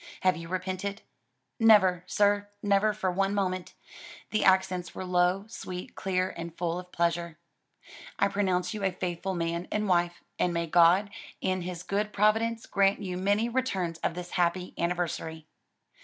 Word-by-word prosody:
Have 185 -1 +3
you 165 0 -7
repented?" 185 +2 -3 0.6
"Never, 195 -6 +5
sir; 205 0 +2
never 205 +1 +3
for 210 -3 -1
one 195 +2 0
moment." 185 -2 -2 0.6
The 215 - +1
accents 185 -2 +2
were 185 - -5
low, 180 +2 +2
sweet, 185 -5 -7
clear, 185 -1 -1
and 170 0 -7
full 170 0 -1
of 180 0 -11
pleasure. 170 -1 -1 0.8
"I 200 - +3
pronounce 190 -1 0
you 210 -2 -5
a 190 - +2
faithful 180 +1 -3
man 170 0 -2
and 210 0 0
wife: 175 -1 +1 0.2
and 175 -1 +1
may 170 0 0
God, 175 +5 +4 0.3
in 185 0 -1
his 175 -1 -5
good 210 +2 -1
providence, 225 +2 +2
grant 195 0 +2
you 180 -2 -3
many 205 +5 +1
returns 195 -10 -1
of 170 - -1
this 180 0 -7
happy 180 0 0
anniversary." 170 -2 -2
185 Hz, 155 wpm, -28 LUFS, 175-200 Hz, 0.8 s, Never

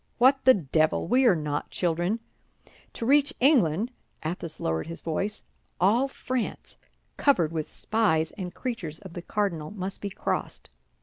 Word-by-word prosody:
What 265 +2 +4
the 260 - +8
devil! 155 -2 +1
we 255 +6 +4
are 210 - +6
not 150 -2 -3
children. 175 +5 0 0.7
To 230 - -4
reach 285 +3 +4
England"—Athos 185 - 0
lowered 80 - -1
his 165 - -5
voice—"all 205 - -1
France, 255 -3 -4 0.4
covered 175 - +3
with 160 -2 -4
spies 165 -8 +1
and 185 -4 -6
creatures 185 - -4
of 190 -2 -11
the 175 - -5
cardinal, 170 -6 -2
must 195 -1 -5
be 200 - -3
crossed. - - -4
190 Hz, 135 wpm, -27 LUFS, 160-240 Hz, 0.7 s, the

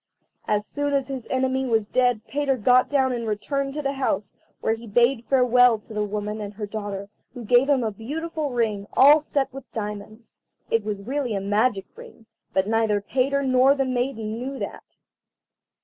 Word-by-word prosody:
As 210 0 +1
soon 285 +3 -2
as 275 -1 0
his 265 -3 -5
enemy 260 0 0
was 220 -3 +1
dead 245 -1 +2
Peter 280 -2 0
got 250 +3 +4
down 265 -2 +2
and 235 -2 -3
returned 275 +7 -2
to 300 - -3
the 275 0 -1
house, 210 -8 -2 0.2
where 220 - +1
he 230 +1 -8
bade 240 +3 +2
farewell 250 -2 +5
to 215 +1 -13
the 210 - -3
old 210 -1 -1
woman 210 +1 -3
and 205 0 -7
her 210 0 -4
daughter, 205 -2 -5 0.3
who 240 -2 -7
gave 245 +5 +4
him 270 -4 +3
a 220 - -1
beautiful 305 +8 -4
ring, 220 -5 -1
all 290 +3 +7
set 280 -3 -2
with 270 -2 -10
diamonds. 215 +1 -7 0.3
It 230 -2 +2
was 205 -1 -4
really 255 -1 -2
a - - 0
magic 205 +1 +1
ring, 465 - -14 0.3
but 190 +1 +1
neither 220 -2 +2
Peter 270 +6 0
nor 260 +1 +4
the 270 -1 0
maiden 245 -3 -2
knew 270 +2 -5
that. - - -8
245 Hz, 190 wpm, -24 LUFS, 210-270 Hz, 0.3 s, all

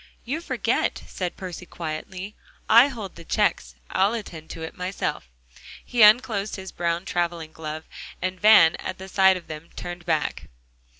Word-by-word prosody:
"You 290 +7 -2
forget," - - -1
said 180 -2 -4
Percy 180 -1 -7
quietly, 180 +5 -6 0.3
"I 235 +4 +8
hold 220 -9 -7
the 170 - -11
checks, 60 - 0 0.2
I'll 200 +4 +2
attend 165 -8 -7
to 165 - -7
it 160 - -7
myself." 180 - -3 0.6
He 245 - 0
unclosed 215 -1 +5
his 190 -1 -8
brown 170 +1 -1
traveling 170 -3 -2
glove, 155 0 -6 0.4
and 185 +1 -3
Van, 205 -6 +7
at 185 - -5
sight 190 -1 +5
of 175 - -11
them, 155 +1 -9
turned 175 -1 -7
back. - - -1
180 Hz, 155 wpm, -25 LUFS, 165-205 Hz, 0.6 s, I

